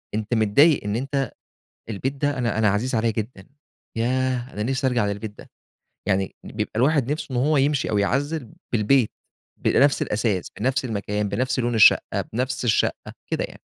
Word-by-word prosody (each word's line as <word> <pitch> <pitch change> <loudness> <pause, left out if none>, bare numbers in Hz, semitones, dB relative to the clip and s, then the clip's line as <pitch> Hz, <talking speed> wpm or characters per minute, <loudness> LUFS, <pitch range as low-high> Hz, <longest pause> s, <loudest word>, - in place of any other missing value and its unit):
أنت 110 +2 -2
متضايق 120 +8 +4
إن 105 +1 -2
أنت 135 +2 -2 0.6
البيت 115 +5 -2
ده 145 0 -1
أنا 115 -3 0
أنا 110 -1 +4
عزيز 110 +6 0
عليَّ 115 0 +1
جدًا، 105 -2 -6 0.5
ياه 125 +2 0
أنا 105 - -3
نِفسي 135 +3 0
أرجع 120 -4 +1
للبيت 100 +1 -5
ده، - - -13 0.6
يعني 95 -1 0
بيبقى - - -4
الواحد 135 +1 +2
نِفسه 155 - -4
إن 125 - -1
هو 150 +5 +2
يمشي 140 0 +1
أو 105 - +1
يعزّل 135 +5 -1 0.2
بالبيت، 115 +2 +3 0.5
بنَفس 140 +1 +4
الأثاث 105 -3 -1
بنَفس 130 +4 0
المكان 105 -2 -2
بنَفس 130 +5 -1
لون 120 -1 0
الشقة 110 - +5
بنَفس 125 +3 -2
الشقة 115 -3 0 0.2
كده - - 0
يعني، - - -9
120 Hz, 165 wpm, -23 LUFS, 105-135 Hz, 0.6 s, الشقة